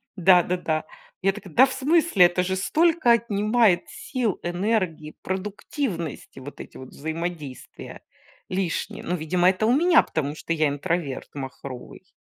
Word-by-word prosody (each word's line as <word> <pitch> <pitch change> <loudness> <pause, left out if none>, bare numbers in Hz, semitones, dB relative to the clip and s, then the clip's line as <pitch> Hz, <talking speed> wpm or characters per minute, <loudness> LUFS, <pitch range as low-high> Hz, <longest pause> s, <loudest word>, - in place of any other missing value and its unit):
Да-да-да. 180 -3 +3 0.4
Я 195 +1 +3
такая: 195 -4 -11
"Да 260 - +7
в 260 - -5
смысле?" 280 - +4
Это 175 +1 +1
же 190 +1 -1
столько 315 - +2
отнимает 215 -3 +3
сил, 270 - -3
энергии, 175 -4 -2
продуктивности, 190 - -4
вот 140 +2 -10
эти - - -10
вот 130 - -10
взаимодействия 160 -3 -7 0.5
лишние. 195 +4 -3
Ну, 180 - -2
видимо, 175 +3 +2
это 190 +3 0
у 240 - +4
меня, 335 +3 +5
потому 145 -2 -3
что 165 - -3
я 155 -2 +2
интроверт 145 0 -3
махровый. 135 -2 -9
185 Hz, 135 wpm, -24 LUFS, 160-225 Hz, 0.5 s, Да